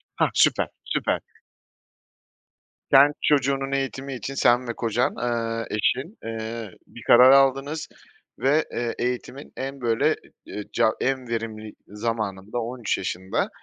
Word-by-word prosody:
Hah, -, -, +2 dB
süper, -, -, +3 dB, 0.2 s
süper. -, -, -1 dB, 1.7 s
Sen 140 Hz, +2 st, +7 dB
çocuğunun 135 Hz, -1 st, +1 dB
eğitimi 135 Hz, 0 st, -2 dB
için 130 Hz, +2 st, -5 dB
sen 125 Hz, -2 st, +3 dB
ve 120 Hz, -, -2 dB
kocan, 120 Hz, +1 st, 0 dB
eee, 115 Hz, -2 st, -2 dB
eşin, 135 Hz, -, -1 dB
eee, 115 Hz, -2 st, -5 dB, 0.2 s
bir 120 Hz, -, -13 dB
karar 125 Hz, +2 st, +8 dB
aldınız 135 Hz, +3 st, +3 dB, 0.5 s
ve, 145 Hz, +4 st, +3 dB
eee, 120 Hz, -1 st, -2 dB
eğitimin 125 Hz, +3 st, -4 dB
en 135 Hz, 0 st, -5 dB
böyle 115 Hz, -1 st, +2 dB, 0.4 s
e -, -, -6 dB
e -, -, -4 dB
ca 115 Hz, -2 st, +3 dB
en 130 Hz, -1 st, -1 dB
verimli 110 Hz, -2 st, -4 dB
zamanında, 105 Hz, 0 st, -3 dB
13 120 Hz, -1 st, -2 dB
yaşında, 95 Hz, 0 st, -2 dB
120 Hz, 130 wpm, -24 LUFS, 115-135 Hz, 1.7 s, karar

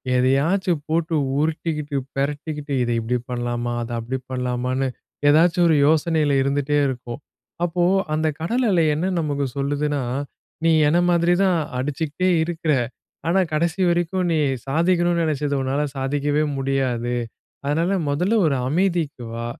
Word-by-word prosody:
எதையாச்சும் 145 Hz, +7 st, +2 dB
போட்டு 165 Hz, 0 st, 0 dB, 0.2 s
உருட்டிக்கிட்டு, 150 Hz, -2 st, -2 dB, 0.2 s
பெரட்டிக்கிட்டு 145 Hz, +1 st, -3 dB
இத 120 Hz, -, -2 dB
இப்டி 120 Hz, +2 st, -1 dB
பண்ணலாமா, 120 Hz, 0 st, -2 dB
அத 115 Hz, -, -7 dB
அப்டி 130 Hz, +3 st, -4 dB
பண்ணலாமான்னு 125 Hz, +1 st, -1 dB, 0.4 s
ஏதாச்சும் 170 Hz, +3 st, +4 dB
ஒரு 160 Hz, -, +4 dB
யோசனையில 155 Hz, -1 st, +2 dB
இருந்துட்டே 145 Hz, +1 st, 0 dB
இருக்கும். 125 Hz, -1 st, -5 dB, 0.4 s
அப்போ 175 Hz, 0 st, 0 dB, 0.3 s
அந்த 155 Hz, +1 st, +1 dB
கடல் 235 Hz, +11 st, 0 dB
அலை 170 Hz, -3 st, +3 dB
என்ன 160 Hz, +5 st, -1 dB
நமக்கு 145 Hz, -3 st, -1 dB
சொல்லுதுன்னா, 145 Hz, +1 st, -1 dB, 0.6 s
நீ 165 Hz, -, +4 dB, 0.2 s
என்ன 160 Hz, -, +3 dB
மாதிரி 170 Hz, 0 st, +3 dB
தான் 185 Hz, -3 st, +3 dB, 0.2 s
அடிச்சுக்கிட்டே 150 Hz, +6 st, -1 dB
இருக்குற. 160 Hz, -2 st, -1 dB, 0.5 s
ஆனா 175 Hz, +3 st, +3 dB
கடைசி 170 Hz, +4 st, 0 dB
வரைக்கும், 175 Hz, +2 st, 0 dB
நீ 160 Hz, -, +2 dB, 0.3 s
சாதிக்கணும்ன்னு 170 Hz, +3 st, +2 dB
நினைச்சது 145 Hz, -2 st, -1 dB
உன்னால 135 Hz, +2 st, 0 dB, 0.2 s
சாதிக்கவே 145 Hz, +2 st, 0 dB
முடியாது. 130 Hz, -3 st, -1 dB, 0.5 s
அதனால, 165 Hz, +6 st, +1 dB, 0.2 s
முதல்ல 180 Hz, +10 st, +1 dB
ஒரு 140 Hz, -3 st, +1 dB
அமைதிக்கு 165 Hz, -6 st, 0 dB
வா. 115 Hz, 0 st, -4 dB
150 Hz, 130 wpm, -22 LUFS, 135-170 Hz, 0.6 s, ஏதாச்சும்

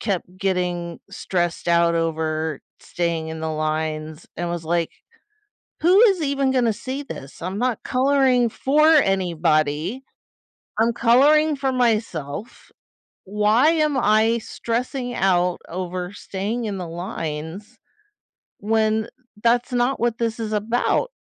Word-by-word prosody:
kept 185 Hz, -3 st, -3 dB
getting 180 Hz, -3 st, -2 dB
stressed 175 Hz, -4 st, -2 dB
out 170 Hz, 0 st, +3 dB
over 160 Hz, -1 st, -1 dB, 0.2 s
staying 170 Hz, -2 st, -2 dB
in 160 Hz, 0 st, -6 dB
the 160 Hz, 0 st, -2 dB
lines 155 Hz, 0 st, -3 dB
and 175 Hz, 0 st, -3 dB
was 170 Hz, -1 st, -4 dB
like, 170 Hz, 0 st, 0 dB, 0.9 s
"Who 360 Hz, +4 st, +5 dB
is 390 Hz, -7 st, +4 dB
even 275 Hz, -2 st, +1 dB
gonna 245 Hz, -4 st, +2 dB
see 265 Hz, +6 st, -5 dB
this? 140 Hz, -, -10 dB
I'm 185 Hz, +3 st, -4 dB
not 250 Hz, -1 st, -1 dB
coloring 260 Hz, -2 st, +2 dB
for 295 Hz, +7 st, +2 dB
anybody, 175 Hz, -, +2 dB, 0.8 s
I'm 230 Hz, +1 st, +3 dB
coloring 290 Hz, +7 st, +4 dB
for 270 Hz, -1 st, -1 dB
myself, 215 Hz, -, -2 dB, 0.5 s
why 210 Hz, +8 st, +3 dB
am 305 Hz, -3 st, +1 dB
I 220 Hz, 0 st, +3 dB
stressing 245 Hz, +3 st, -3 dB
out 180 Hz, -3 st, +2 dB
over 180 Hz, +1 st, -4 dB
staying 205 Hz, +5 st, -4 dB
in 205 Hz, -2 st, -3 dB
the 180 Hz, -2 st, -5 dB
lines 170 Hz, +4 st, -6 dB, 0.8 s
when 220 Hz, +1 st, +1 dB, 0.3 s
that's 240 Hz, +2 st, +2 dB
not 245 Hz, +2 st, +1 dB
what 235 Hz, -1 st, 0 dB
this 230 Hz, 0 st, -1 dB
is 220 Hz, -1 st, -3 dB
about?" 230 Hz, -, 0 dB
210 Hz, 125 wpm, -22 LUFS, 170-245 Hz, 0.9 s, Who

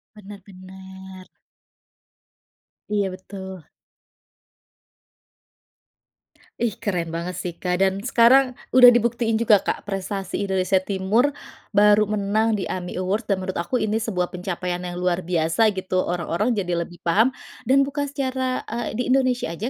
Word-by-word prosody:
Benar 205 Hz, -1 st, -11 dB
benar. 190 Hz, 0 st, -12 dB, 1.6 s
Iya 205 Hz, -2 st, 0 dB
betul. 190 Hz, -2 st, -9 dB, 2.9 s
Ih, 235 Hz, -4 st, 0 dB
keren 170 Hz, -5 st, -2 dB
banget 170 Hz, +2 st, -4 dB
sih, 175 Hz, -2 st, -4 dB
Kak. 180 Hz, +1 st, -2 dB
Dan 195 Hz, +1 st, +1 dB
sekarang 250 Hz, +2 st, +4 dB, 0.2 s
udah 250 Hz, -1 st, +9 dB
dibuktiin 235 Hz, -1 st, +1 dB
juga, 220 Hz, -3 st, +4 dB
Kak. -, -, -3 dB
Prestasi 195 Hz, -1 st, -4 dB
Indonesia 190 Hz, -1 st, +1 dB
Timur 200 Hz, +8 st, +1 dB, 0.4 s
baru 210 Hz, 0 st, +4 dB
menang 215 Hz, +1 st, +1 dB
di 190 Hz, -, -3 dB
AMI 180 Hz, -1 st, -5 dB
Awards. 200 Hz, +4 st, -2 dB
Dan 195 Hz, -, +2 dB
menurut 185 Hz, -, -2 dB
aku 250 Hz, +9 st, -1 dB
ini 215 Hz, 0 st, -1 dB
sebuah 180 Hz, -6 st, -2 dB
pencapaian 180 Hz, -1 st, -4 dB
yang 175 Hz, -1 st, -6 dB
luar 180 Hz, 0 st, 0 dB
biasa 170 Hz, +5 st, +1 dB
gitu. 185 Hz, -2 st, -1 dB
Orang-orang 180 Hz, +6 st, -1 dB
jadi 175 Hz, -3 st, -1 dB
lebih 175 Hz, +1 st, -8 dB
paham, 215 Hz, +9 st, +4 dB, 0.4 s
dan 275 Hz, +1 st, +5 dB
bukan 285 Hz, 0 st, -3 dB
secara, 260 Hz, -2 st, -2 dB
eee, 230 Hz, -1 st, -4 dB
di 250 Hz, -, 0 dB
Indonesia 255 Hz, -8 st, +1 dB
aja 215 Hz, +9 st, -4 dB
195 Hz, 135 wpm, -23 LUFS, 185-225 Hz, 2.9 s, udah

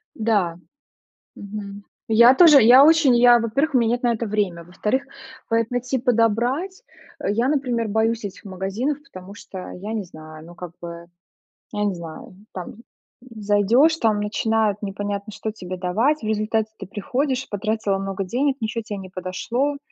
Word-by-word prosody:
Да. 205 Hz, -7 st, 0 dB, 0.8 s
Мгм. 200 Hz, 0 st, -8 dB, 0.2 s
Я 235 Hz, +3 st, +7 dB
тоже 305 Hz, -3 st, +8 dB
я 255 Hz, +5 st, +8 dB
очень 315 Hz, -5 st, +5 dB
я 240 Hz, 0 st, +6 dB
во-первых, 270 Hz, +6 st, -1 dB
у 255 Hz, -, +6 dB
мя 235 Hz, -, +2 dB
нет 240 Hz, +1 st, -1 dB
на 240 Hz, -1 st, +2 dB
это 230 Hz, 0 st, -3 dB
время. 200 Hz, -5 st, -2 dB
Во-вторых, 210 Hz, +10 st, -2 dB, 0.4 s
поэт 230 Hz, 0 st, 0 dB
найти, 250 Hz, +1 st, -1 dB
подобрать. 245 Hz, -, 0 dB, 0.4 s
Э, -, -, -1 dB
я, 235 Hz, +5 st, +1 dB
например, 250 Hz, -6 st, 0 dB
боюсь 220 Hz, +1 st, 0 dB
этих 200 Hz, +2 st, -8 dB
магазинов, 200 Hz, +9 st, -3 dB
потому 195 Hz, -8 st, -12 dB
что 190 Hz, -2 st, -9 dB
я 205 Hz, +4 st, -6 dB
не 210 Hz, -3 st, -3 dB
знаю, 155 Hz, -2 st, -12 dB
ну, 175 Hz, +1 st, -13 dB
как 175 Hz, -1 st, -9 dB
бы, 170 Hz, 0 st, -8 dB, 0.7 s
я 210 Hz, 0 st, -1 dB
не 200 Hz, -, 0 dB
знаю, 170 Hz, +1 st, -10 dB, 0.2 s
там, 180 Hz, -2 st, -6 dB
м, -, -, -18 dB, 0.4 s
зайдешь, 230 Hz, +6 st, +2 dB
там 220 Hz, -7 st, +1 dB
начинают 215 Hz, 0 st, 0 dB
непонятно 205 Hz, +1 st, -4 dB
что 215 Hz, +1 st, -4 dB
тебе 185 Hz, -4 st, -7 dB
давать, 225 Hz, +12 st, 0 dB
в 215 Hz, -, -5 dB
результате 215 Hz, 0 st, 0 dB
ты 195 Hz, -, -7 dB
приходишь, 260 Hz, +7 st, -2 dB
потратила 215 Hz, -1 st, -1 dB
много 195 Hz, 0 st, -3 dB
денег, 265 Hz, +8 st, 0 dB
ничего 225 Hz, +1 st, -3 dB
те 210 Hz, -1 st, -6 dB
не 190 Hz, -, -9 dB
подошло. 230 Hz, +10 st, -3 dB
220 Hz, 165 wpm, -22 LUFS, 195-245 Hz, 0.8 s, тоже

